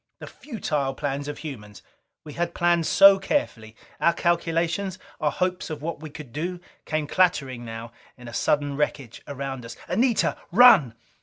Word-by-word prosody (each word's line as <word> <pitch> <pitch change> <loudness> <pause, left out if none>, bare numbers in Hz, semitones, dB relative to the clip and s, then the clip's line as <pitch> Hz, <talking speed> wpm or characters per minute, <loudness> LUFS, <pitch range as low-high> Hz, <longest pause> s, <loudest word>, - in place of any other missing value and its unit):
The - - -9
futile 155 - -3
plans 145 0 -3
of 145 - -5
humans! 105 -10 -9 0.4
We 150 - -10
had 170 +2 -3
planned 170 -1 +2
so 195 0 +7
carefully! 115 - -2 0.2
Our 170 - +3
calculations, 170 +2 0 0.2
our 150 - +1
hopes 180 +3 -2
of 150 -2 -6
what 170 -1 -4
we 155 0 -8
could 145 -4 -11
do, 175 +4 -3 0.3
came 155 -1 -1
clattering 145 -8 +1
now 115 0 -7 0.3
in 125 -1 -12
a 120 - -9
sudden 145 +3 0
wreckage 140 -4 -3
around 135 -3 -5
us. 115 0 -9
"Anita! 235 -1 +1
Run!" 175 - +7
150 Hz, 160 wpm, -25 LUFS, 135-175 Hz, 0.4 s, so